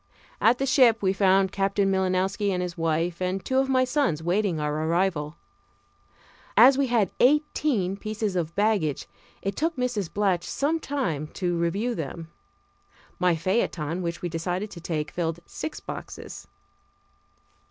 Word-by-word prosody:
At 235 +2 +5
the 270 - -1
ship 250 -6 +4
we 190 0 +3
found 195 -1 +3
Captain 195 0 +1
Milinowski 190 +2 0
and 185 -2 0
his 175 -1 -5
wife 165 +1 -1
and 185 +1 -2
two 260 0 +2
of 270 0 +1
my 255 -1 +3
sons 255 - 0
waiting 180 -1 +1
our 150 +1 -1
arrival. 165 -3 0 1.2
As 260 +2 +8
we 275 0 +1
had 230 -6 +2
eighteen 270 - +2
pieces 215 -1 -3
of 170 -2 -2
baggage 200 -8 +1 0.4
it 195 0 -2
took 325 +2 0
Mrs. 245 -8 -2
Blatch 195 -4 +1
some 300 +4 0
time 185 - -2
to 175 -2 -1
review 190 +8 0
them. 165 -1 -6 0.9
My 180 -1 +3
phaeton, 170 -2 -1
which 170 -1 -4
we - - 0
decided 180 +5 -3
to 170 - -9
take, 155 -3 -3
filled 165 -1 -2
six 310 - -6
boxes. - - -8
190 Hz, 150 wpm, -26 LUFS, 170-230 Hz, 1.2 s, As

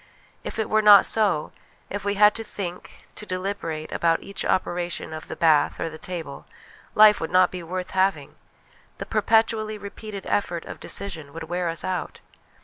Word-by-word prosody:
If - - -5
it 220 - -1
were 215 0 +2
not 205 -2 +8
so 200 -9 +1 0.4
if 205 0 -4
we 200 0 -1
had 210 +1 +6
to 225 - -5
think, 180 -4 -8
to - - -8
deliberate, 185 -5 -4
about 165 -1 +1
each 200 0 -4
operation 175 -3 -2
of 155 +2 -8
the - - -6
bath 155 -3 +3
or 165 - -2
the 155 0 -10
table 165 -6 -7 0.5
life 210 -2 +7
would 160 - -2
not 185 0 +4
be 180 - -6
worth 180 +2 -5
having; 190 +1 0 0.6
the - - -6
perpetually 220 -1 +1
repeated 205 0 -8
effort 175 -4 -1
of - - -9
decision 160 -8 -4
would 165 - -6
wear 175 0 -2
us 165 - -2
out. 185 -2 -4
185 Hz, 175 wpm, -24 LUFS, 165-205 Hz, 0.6 s, not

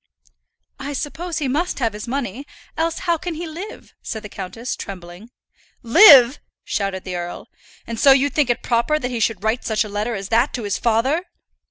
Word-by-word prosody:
"I 280 +2 -5
suppose 320 +5 -4
he 295 - -1
must 315 +8 -1
have 230 -5 0
his 210 +3 -7
money; 265 +1 -4 0.3
else 330 0 -1
how 340 -2 +1
can 345 -1 -4
he 340 +3 -5
live?" 340 +6 -9
said 220 0 -6
the 210 - -8
countess, 225 +5 -5
trembling. 180 +3 -9 0.5
"Live!" 260 - +8 0.2
shouted 195 -2 -2
the 185 -1 -5
earl. 175 0 -6 0.4
"And 230 -1 -5
so 275 - +7
you 275 +1 +4
think 295 -5 +1
it 240 - 0
proper 240 +6 +1
that 250 -4 -4
he 240 - -2
should 220 -3 0
write 220 +3 0
such 220 -1 0
a 210 - -8
letter 210 +3 -2
as 195 -1 -6
that 235 +4 +2
to 240 - -4
his 205 -1 -2
father!" 260 +10 +1
240 Hz, 195 wpm, -21 LUFS, 210-290 Hz, 0.5 s, Live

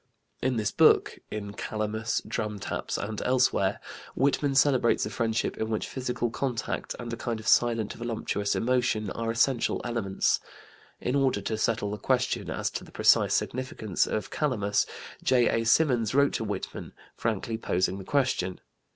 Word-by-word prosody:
In 130 0 +1
this 105 -2 0
book - - +4
in 100 -1 -5
"Calamus," 110 +1 -2
"Drumtaps," 105 -2 -3
and 105 0 -4
elsewhere 125 -6 +2 0.4
Whitman 140 +1 +1
celebrates 135 -3 +3
a 105 - -5
friendship 115 0 -1
in 110 - -2
which 110 -1 -1
physical 125 -2 -2
contact 125 -3 -3
and 120 -1 -6
a - - 0
kind 115 -1 -3
of 110 - -9
silent 115 -3 +3
voluptuous 115 -3 -2
emotion 120 -4 +1
are 115 0 -3
essential 115 +2 +2
elements. 115 -5 0 0.6
In 125 - -1
order 135 -7 +2
to 110 +3 -2
settle 110 -1 0
the 105 - -3
question - - 0
as - - -2
to - - -5
the - - -14
precise - - +4
significance 120 -6 -1
of 110 - -3
"Calamus," 105 -9 +1 0.3
J.A. 120 -2 +3
Symonds 125 -4 +3
wrote 140 0 +4
to - - -1
Whitman, 105 -1 -5 0.2
frankly 110 0 -2
posing 95 -1 0
the - - -7
question. 125 -9 0
115 Hz, 150 wpm, -28 LUFS, 105-125 Hz, 0.6 s, book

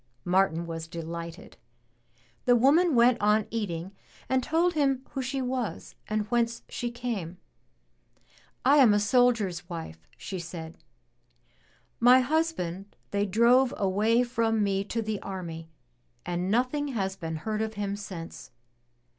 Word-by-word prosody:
Martin 175 -2 +2
was 165 -1 -6
delighted. 170 0 -7 0.9
The 245 - +5
woman 290 +6 +4
went 240 +1 +4
on 210 +1 +3
eating 190 -5 -3 0.4
and 260 0 +2
told 335 +6 +1
him 275 -4 +1
who 270 - -3
she 265 +1 -2
was 250 -3 -3
and 215 0 0
whence 235 -1 0
she 240 -2 -4
came. 230 -8 -4 1.3
*1 280 +3 +6
am 240 -6 +7
a - - +3
soldier's 210 -6 +2
wife," 80 - -8
she 190 - -6
said. 165 -1 -8 1.2
*'My 250 +2 +7
husband 245 - -2 0.2
they 205 0 0
drove 240 +6 +4
away 210 +5 +2
from 225 -3 0
me 195 -1 0
to 225 +2 -2
the 215 -1 -3
army 165 -4 -6 0.6
and 175 +1 -2
nothing 255 +7 +1
has 195 -8 -2
been 165 -4 -5
heard 215 +7 -3
of 220 0 -3
him 200 -1 -2
since. 190 -5 -8
215 Hz, 135 wpm, -28 LUFS, 180-250 Hz, 1.3 s, am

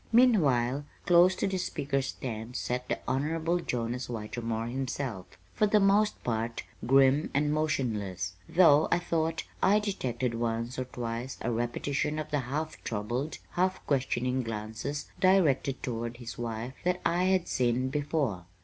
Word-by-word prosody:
Meanwhile, 145 - +4 0.2
close 175 +1 +6
to - - -1
the 190 -1 -1
speaker's 140 -5 -1
stand 115 -2 -5
sat 125 0 -2
the - - +1
Honorable 160 +6 0
Jonas 125 -4 -2
Whitermore 115 0 -3
himself, 125 -5 -3 0.3
for 210 - +3
the 210 +1 +4
most 205 +2 +3
part 115 0 -2 0.2
grim 135 +3 +5
and 145 +1 +2
motionless, 105 - -1 0.2
though 160 -4 +6
I 175 - +5
thought 165 -2 -1 0.2
I 205 +2 +5
detected 130 - -1
once 115 +1 -2
or 130 - -1
twice 120 +1 -5
a 120 - -1
repetition 135 +6 -1
of 155 0 -4
the 145 - +2
half 150 +5 -4
troubled, 120 +7 -2
half 185 +1 0
questioning 130 -2 0
glances 115 +5 -4
directed 165 -8 +3
toward 115 -1 -3
his 120 -1 -7
wife 120 +1 -4
that 180 0 +1
I 175 +2 +2
had 185 -2 +2
seen 125 +1 +1
before. 140 - -1
130 Hz, 145 wpm, -29 LUFS, 120-160 Hz, 0.3 s, close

